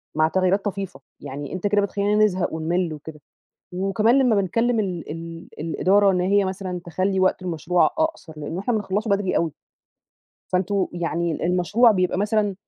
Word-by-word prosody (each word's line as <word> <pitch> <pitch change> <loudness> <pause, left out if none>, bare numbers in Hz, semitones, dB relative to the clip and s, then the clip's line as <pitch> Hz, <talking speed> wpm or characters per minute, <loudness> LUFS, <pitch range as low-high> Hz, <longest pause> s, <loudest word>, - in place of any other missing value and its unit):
مع 155 0 +4
تغييرات 190 +4 +1
طفيفة، 195 -8 -4 0.2
يعني 145 +1 -7
أنت 185 +2 -1
كده 205 0 +3
بتخلينا 200 +1 0
نزهق 185 -5 -1
ونِمّل 165 +1 -1
وكده، 150 0 -10 0.5
وكمان 195 +7 +2
لما 250 -4 +3
بنكلم 230 +5 +1
ال 180 -7 -3
ال 165 +1 -8
الإدارة 195 +5 +3
إن 180 -1 +1
هي 200 +2 +3
مثلًا 185 -1 -4
تخلي 185 +3 0
وقت 185 0 +2
المشروع 175 0 +1
أقصر، 315 - -2
لأنه 150 +4 -5
إحنا 220 +5 -1
بنخلصه 210 0 -1
بدري 200 -1 +1
أوي. 165 -1 0 1.0
فأنتم 190 +1 +1
يعني 170 -1 -2
المشروع 190 +7 +4
بيبقى 185 -3 +1
مثلًا 205 0 +1
185 Hz, 155 wpm, -23 LUFS, 170-205 Hz, 1.0 s, مع